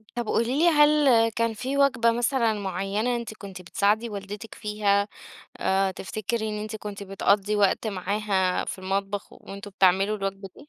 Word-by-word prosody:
طب 240 -1 -2
قولي 235 +5 0
لي 340 +2 +5
هل 295 -7 +5
كان 230 0 -1
في 260 +6 -3
وجبة 255 -4 +3
مثلًا 240 -1 +1
معيّنة 200 +4 -2
أنتِ 235 -2 -6
كنتِ 195 -3 -10
بتساعدي 210 +5 +1
والدتِك 205 +1 -7
فيها 210 -1 0 0.5
آآ، 190 0 +1
تفتكري 215 +4 -3
إن 210 0 -4
أنتِ 215 0 -5
كنتِ 205 -1 -7
بتقضّي 200 +1 +1
وقت 205 +2 +2
معاها 195 -1 0
في - - -6
المطبخ 195 +2 -3
و - - -13
وأنتم 200 +1 -9
بتعملوا 195 +2 +3
الوجبة 195 -1 -4
دي؟ 290 - -15
210 Hz, 165 wpm, -25 LUFS, 195-230 Hz, 0.5 s, لي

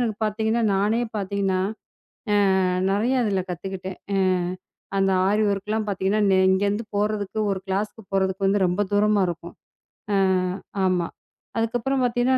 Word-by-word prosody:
எனக்கு 225 -4 -1
பாத்தீங்கன்னா 220 +2 0
நானே 210 +4 +2 0.2
பாத்தீங்கன்னா, 195 -2 0 0.7
அஹ் 190 -2 +3
நிறைய 220 +6 +1
அதுல 195 -3 0
கத்துக்கிட்டேன். 190 +1 -6 0.2
அஹ் 185 -2 +1 0.4
அந்த 195 0 +3 0.2
ஆரிவொர் 205 0 +2
க்கு 205 - -26
எல்லாம் 215 0 0
பாத்தீங்கன்னா, 195 0 +2
இங்க 190 +1 +2
இருந்து 210 +3 -1
போறதுக்கு 210 0 -1
ஒரு 190 -1 -2
கிளாஸ் 200 +2 -1 0.2
போறதுக்கு 190 0 +1
வந்து 200 +1 +2
ரொம்ப 180 +3 -1
தூரமா 210 0 +3
இருக்கும். 170 0 -6 0.6
அஹ் 185 -1 +2 0.3
ஆமா. 180 -2 +1 0.5
அதுக்கப்புறம் 245 +4 0
பார்த்தீங்கன்னா 245 +2 +2
200 Hz, 135 wpm, -24 LUFS, 190-215 Hz, 0.7 s, அஹ்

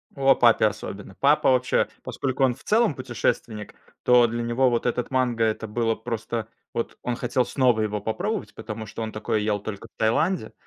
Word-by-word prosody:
О, 135 -1 +4
папе 115 -2 +5
особенно! 100 -2 -7
Папа 145 +2 +4
вообще, 125 -1 +2 0.2
поскольку 135 0 -2
он 130 -2 +4
в - - -17
целом 225 -4 +3
путешественник, 120 -4 -3 0.3
то 125 -1 +6
для 120 +1 -3
него 120 +3 +2
вот 120 -1 -1
этот 120 0 -1
манго- 125 -3 +1
это 110 0 0
было 115 +1 0
просто 115 -1 -4 0.3
Вот 115 - -3
он 125 - -1
хотел 125 +1 0
снова 125 -5 +2
его 105 -1 -1
попробовать, 210 - -3
потому 110 0 -6
что 115 - -7
он 110 -1 -3
такое 110 0 -1
ел 105 -1 0
только 105 +2 -7
в - - -68
Таиланде, 155 +12 +1
120 Hz, 185 wpm, -25 LUFS, 110-130 Hz, 0.3 s, то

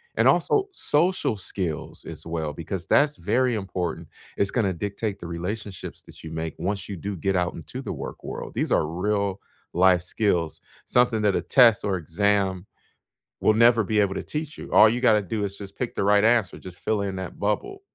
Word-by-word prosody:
And - - +3
also, 405 -1 +2
social 170 - +1
skills 90 -4 -4
as - - -9
well, 80 -3 -3
because 85 +2 -5
that's 145 +1 +3
very 125 0 +1
important. 90 -5 -4 0.3
It's 100 0 +1
gonna 100 -6 +1
dictate 100 +3 -4
the 85 - -7
relationships 95 +3 -5
that - - -15
you 80 - -7
make 80 -1 -4
once 100 +4 -3
you 100 - -5
do 100 +3 -5
get 95 +3 0
out 90 0 0
into 85 - -7
the - - -5
work - - -7
world. - - -6
These - - -1
are 75 - +3
real-life 95 -1 0
skills, 90 -5 -1 0.2
something 120 -3 +2
that 100 -2 +3
a - - +1
test 115 +5 +5
or 100 -2 0
exam 95 +2 0 0.8
will 110 - +4
never 115 -1 +5
be 105 +1 0
able 100 -1 +2
to - - -3
teach 150 0 -5
you. - - -9
All 110 - +8
you 120 +2 -1
gotta 110 -4 +5
do 105 +3 -3
is 100 0 -4
just 100 -1 -9
pick 125 - -4
the - - 0
right 100 +1 +4
answer, 115 -4 +3
just 90 -1 -11
fill 110 -2 0
in 95 -1 -3
that 95 -1 -7
bubble. 105 - -2
100 Hz, 195 wpm, -25 LUFS, 90-110 Hz, 0.8 s, All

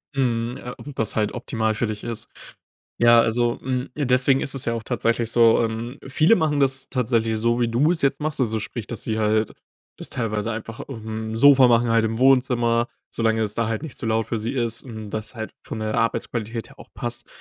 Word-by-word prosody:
Mhm, 120 -2 0
ja, 125 - -8
ob 145 - -9
das 110 - +2
halt 105 -1 0
optimal 110 -2 -1
für 115 +1 -1
dich 105 -1 -5
ist. 115 -2 -5 0.7
Ja, 120 0 +7
also, 120 +1 +1
hm, 130 0 -2
deswegen 130 -1 +3
ist 135 - -1
es 130 - -1
ja 115 - 0
auch 115 -1 -4
tatsächlich 115 -1 0
so, 115 -1 +5
ähm 115 +3 -4
viele 155 +10 +4
machen 150 -6 +1
das 135 -1 +1
tatsächlich 115 -3 0
so, 120 +2 +1
wie 120 - +2
du 135 +8 +2
es 175 - -1
jetzt 140 - +1
machst. 155 -1 -2
Also, 110 -3 0
sprich, 110 0 -6
dass 120 - -6
sie 110 -1 -2
halt 110 0 +1 0.5
das - - -4
teilweise 115 -1 -2
einfach 115 0 -6
aufm 110 -3 -6
Sofa 135 +1 +7
machen, 120 0 +3
halt 115 0 +3
im 110 0 -2
Wohnzimmer, 120 -3 +3 0.3
solange 110 -1 +1
es 105 -2 0
da 115 -1 0
halt 115 +6 -3
nicht 155 - -7
zu - - -5
laut 110 0 +1
für 115 - -2
sie 115 +4 -3
ist, 115 -3 -1
hm, 110 -4 -8
und - - -9
das 110 +2 -4
halt 110 -1 -5
von 110 - -6
der 110 0 -2
Arbeitsqualität 115 0 -2
her - - -19
auch - - -12
passt. 120 0 -2
115 Hz, 220 wpm, -23 LUFS, 110-125 Hz, 0.7 s, Ja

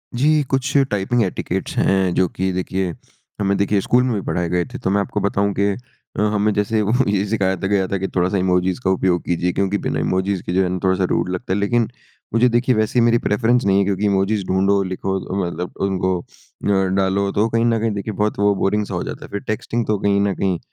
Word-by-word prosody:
जी। 150 +5 +3
कुछ 135 +1 +1
typing 105 +4 +1
etiquettes 95 - -3
हैं 95 -2 +2
जो 95 - +3
कि 95 +2 -2
देखिए, 95 -1 -2 0.5
हमें 100 -1 +1
देखिए 100 0 +1
स्कूल 125 +5 +3
में 125 - 0
भी 100 - -2
पढ़ाए 90 -1 -1
गए 90 0 +1
थे, 130 +1 -8
तो - - -1
मैं 100 +1 +2
आपको 105 - -3
बताऊँ 100 0 0
कि 100 0 +3 0.5
अ, - - +1
हमें 105 0 +2
जैसे 105 +2 0 0.3
ये 100 -1 +1
सिखाया 95 -4 +1
था 95 - -3
गया 95 -2 +1
था 100 - -1
कि 95 +1 -2
थोड़ा-सा 90 +2 +1
इमोजिज़ 90 +2 +1
का - - +1
उपयोग 95 -2 +1
कीजिए, 90 +1 0
क्योंकि 100 +1 0
बिना - - -2
इमोजिज़ 95 0 0
के 90 - -4
जो 95 - +3
है 90 - -1
थोड़ा-सा 95 0 +2
रूड - - 0
लगता 90 +1 -3
है। 100 - 0
लेकिन 115 +3 +1 0.5
मुझे 120 +2 +4
देखिए, 120 +1 +2
वैसे 110 +3 0
ये 115 - +4
मेरी 120 0 +4
प्रेफरेंस 115 +3 +2
नहीं 100 0 +3
है - - +3
क्योंकि 100 +1 -1
इमोजिज़ 100 +1 +1
ढूँढो, 100 +1 +2
लिखो 95 +1 -2
अ, 95 - -6
मतलब 85 +1 -5
उनको 95 -1 0
अ, - - -10 0.7
डालो, 100 +1 +1
तो 105 - 0
वो 115 - 0
कहीं 115 +1 +1
न 115 -1 +2
कहीं 115 0 0
देखिए 100 +2 -4
बहुत 105 0 -1
वो 100 0 +4
बोरिंग 105 +2 0
सा 100 - -7
हो 85 - -2
जाता - - -7
है। - - -14
फिर 100 - -3
टेक्स्टिंग 115 +2 -2
तो 105 - +1
कहीं 100 0 +2
न 100 -1 +1
कहीं 95 -3 -1
100 Hz, 235 wpm, -20 LUFS, 95-105 Hz, 0.7 s, मुझे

